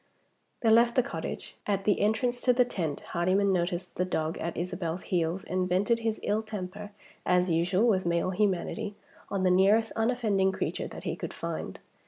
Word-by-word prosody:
They 225 Hz, -, +4 dB
left 235 Hz, +1 st, +5 dB
the 255 Hz, -, +4 dB
cottage. -, -, -6 dB
At 200 Hz, -1 st, 0 dB
the 205 Hz, -, +3 dB
entrance 240 Hz, +4 st, +1 dB
to 250 Hz, -, +4 dB
the 250 Hz, 0 st, +4 dB
tent, 165 Hz, -11 st, -3 dB
Hardyman 190 Hz, +3 st, +2 dB
noticed 175 Hz, 0 st, -1 dB
the 180 Hz, -, 0 dB
dog 160 Hz, -3 st, -1 dB
at 170 Hz, 0 st, -4 dB
Isabel's 175 Hz, 0 st, -3 dB
heels, 175 Hz, +1 st, -1 dB
and 185 Hz, 0 st, -1 dB
vented 200 Hz, +6 st, +2 dB
his 225 Hz, -1 st, -1 dB
ill 210 Hz, +1 st, +1 dB
temper, 205 Hz, -1 st, -6 dB, 0.3 s
as 180 Hz, 0 st, +2 dB
usual 180 Hz, +7 st, +2 dB
with 190 Hz, -5 st, +3 dB
male 170 Hz, +1 st, 0 dB
humanity, 205 Hz, +2 st, -1 dB, 0.3 s
on 195 Hz, -2 st, -1 dB
the 185 Hz, -, +4 dB
nearest 205 Hz, +5 st, +4 dB
unoffending 220 Hz, -5 st, +1 dB
creature -, -, -2 dB
that -, -, -9 dB
he -, -, -2 dB
could -, -, -6 dB
find. -, -, -5 dB
190 Hz, 180 wpm, -29 LUFS, 180-220 Hz, 0.3 s, left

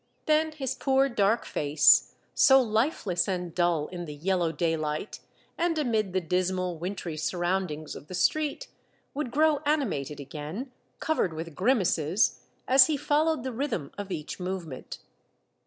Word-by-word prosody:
Then 310 Hz, 0 st, +2 dB
his 270 Hz, -4 st, -3 dB
poor 270 Hz, 0 st, +2 dB
dark 220 Hz, -1 st, +1 dB
face, 145 Hz, +1 st, +4 dB, 0.2 s
so 265 Hz, -1 st, +6 dB
hfeless 215 Hz, -, 0 dB
and 180 Hz, -3 st, -3 dB
dull 175 Hz, -4 st, +1 dB
in 175 Hz, -1 st, -6 dB
the 150 Hz, -2 st, -8 dB
yellow 175 Hz, +1 st, 0 dB
daylight 160 Hz, +2 st, -2 dB, 0.4 s
and 335 Hz, -1 st, +1 dB
amid 220 Hz, -9 st, 0 dB
the 185 Hz, -, +1 dB
dismal 180 Hz, 0 st, -1 dB
wintry 175 Hz, -2 st, -4 dB
sur 155 Hz, +4 st, -3 dB
roundings 175 Hz, -4 st, -2 dB
of 145 Hz, -, -11 dB
the 185 Hz, -, -6 dB
street, 310 Hz, -, 0 dB, 0.5 s
would 285 Hz, -3 st, -3 dB
grow 305 Hz, +4 st, +3 dB
animated 260 Hz, -, -1 dB
again, 155 Hz, -, -6 dB, 0.3 s
covered 195 Hz, -, 0 dB
with 165 Hz, 0 st, -6 dB
grimaces, 185 Hz, -, +1 dB, 0.3 s
as 260 Hz, 0 st, +7 dB
he 310 Hz, -2 st, 0 dB
followed 300 Hz, 0 st, +1 dB
the 260 Hz, -1 st, -4 dB
rhythm 225 Hz, -, -3 dB
of 200 Hz, -1 st, -7 dB
each 150 Hz, +1 st, -5 dB
movement. 180 Hz, -7 st, -5 dB
190 Hz, 145 wpm, -27 LUFS, 165-265 Hz, 0.5 s, as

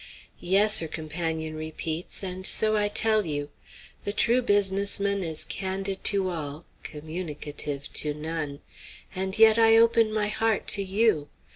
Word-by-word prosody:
"Yes," 205 Hz, +4 st, +5 dB
her 165 Hz, -, -3 dB
companion 160 Hz, 0 st, -4 dB
repeats; 155 Hz, +3 st, -4 dB
"and 185 Hz, 0 st, -5 dB
so 215 Hz, +3 st, +3 dB
I 210 Hz, -1 st, +2 dB
tell 215 Hz, +1 st, +2 dB
you. 145 Hz, -3 st, -4 dB, 0.5 s
The 205 Hz, -, -2 dB
true 235 Hz, +4 st, +2 dB
business 200 Hz, -3 st, +1 dB
man 200 Hz, -1 st, -1 dB
is 160 Hz, -2 st, -3 dB
candid 195 Hz, 0 st, -3 dB
to 195 Hz, -2 st, +3 dB
all, 155 Hz, -3 st, -5 dB, 0.2 s
communicative 150 Hz, -3 st, -6 dB
to 150 Hz, -1 st, 0 dB
none. 150 Hz, -2 st, -5 dB, 0.5 s
And 190 Hz, +1 st, -1 dB
yet 220 Hz, 0 st, +6 dB
I 225 Hz, 0 st, +6 dB
open 230 Hz, -1 st, +4 dB
my 215 Hz, -1 st, 0 dB
heart 220 Hz, 0 st, -1 dB
to 200 Hz, -, +1 dB
you. 195 Hz, -6 st, +1 dB
190 Hz, 145 wpm, -26 LUFS, 155-210 Hz, 0.5 s, yet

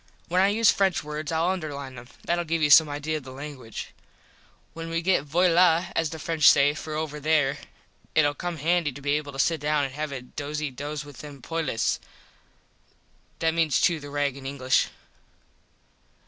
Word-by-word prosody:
When 180 Hz, +2 st, +3 dB
I 195 Hz, -, +5 dB
use 215 Hz, +2 st, +4 dB
French 195 Hz, -2 st, +1 dB
words 150 Hz, 0 st, -5 dB
Ill 165 Hz, +1 st, +1 dB
underline 150 Hz, -7 st, -3 dB
them. 120 Hz, -1 st, -11 dB, 0.2 s
Thatll 175 Hz, 0 st, 0 dB
give 165 Hz, 0 st, -1 dB
you 145 Hz, -, +3 dB
some 155 Hz, +1 st, +8 dB
idea 150 Hz, +2 st, -2 dB
of 150 Hz, -, -9 dB
the 130 Hz, -, -10 dB
languige. 135 Hz, -4 st, -8 dB, 0.8 s
When 165 Hz, 0 st, -6 dB
we 165 Hz, 0 st, -2 dB
get 180 Hz, -5 st, +2 dB
voila 175 Hz, +2 st, +3 dB
as 165 Hz, -1 st, +1 dB
the 160 Hz, -, -7 dB
French 160 Hz, -1 st, +4 dB
say 145 Hz, +1 st, +5 dB
for 155 Hz, 0 st, -6 dB
over 155 Hz, -1 st, -3 dB
there 150 Hz, -2 st, +1 dB, 0.6 s
itll 145 Hz, -2 st, +3 dB
come 175 Hz, 0 st, -4 dB
handy 165 Hz, 0 st, +1 dB
to 140 Hz, -, -9 dB
be 145 Hz, 0 st, -2 dB
able 145 Hz, -1 st, -1 dB
to 135 Hz, -, -10 dB
sit 160 Hz, +2 st, +1 dB
down 150 Hz, 0 st, +1 dB
and 135 Hz, -1 st, -3 dB
have 150 Hz, +1 st, -4 dB
a 135 Hz, -2 st, -5 dB
dosy 145 Hz, +3 st, -4 dB
dos 145 Hz, +3 st, -5 dB
with 145 Hz, -2 st, -12 dB
them 145 Hz, -2 st, -10 dB
poilus. 155 Hz, -4 st, -1 dB, 1.4 s
(That 165 Hz, -1 st, +1 dB
means 160 Hz, -5 st, +2 dB
chew 170 Hz, -2 st, +2 dB
the 145 Hz, -1 st, -9 dB
rag 145 Hz, -2 st, -1 dB
in 135 Hz, -1 st, -8 dB
English.) 130 Hz, -2 st, +1 dB
150 Hz, 190 wpm, -26 LUFS, 145-165 Hz, 1.4 s, some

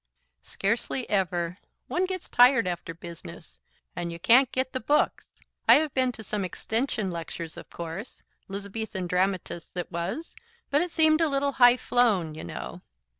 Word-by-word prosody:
"Scarcely 230 Hz, +5 st, -2 dB
ever. 180 Hz, -2 st, 0 dB, 0.3 s
One 370 Hz, +1 st, 0 dB
gets 370 Hz, -1 st, -5 dB
tired 245 Hz, -1 st, +6 dB
after 175 Hz, -1 st, -3 dB
business, 170 Hz, -, -11 dB, 0.4 s
and 175 Hz, -1 st, -3 dB
you 170 Hz, -, -6 dB
can't 240 Hz, +8 st, +5 dB
get 260 Hz, 0 st, -1 dB
the 260 Hz, -, -1 dB
books. 290 Hz, +6 st, +1 dB, 0.4 s
I -, -, +11 dB
have 305 Hz, -1 st, +1 dB
been 255 Hz, -1 st, +2 dB
to 220 Hz, -, -10 dB
some 210 Hz, 0 st, -2 dB
extension 220 Hz, +2 st, -2 dB
lectures, 165 Hz, -1 st, -6 dB
of -, -, -10 dB
course, 170 Hz, +7 st, -7 dB, 0.2 s
'Lizabethan 200 Hz, 0 st, -4 dB
Dramatists,' 180 Hz, -1 st, -1 dB
it 175 Hz, -, -4 dB
was, 175 Hz, -, -4 dB, 0.4 s
but 285 Hz, -, +4 dB
it 355 Hz, -, -1 dB
seemed 315 Hz, -1 st, +4 dB
a 320 Hz, -, +3 dB
little 280 Hz, 0 st, +1 dB
high 245 Hz, -2 st, +6 dB
flown, 210 Hz, -12 st, +2 dB
you 155 Hz, -, -8 dB
know. -, -, -7 dB
215 Hz, 160 wpm, -27 LUFS, 175-260 Hz, 0.4 s, I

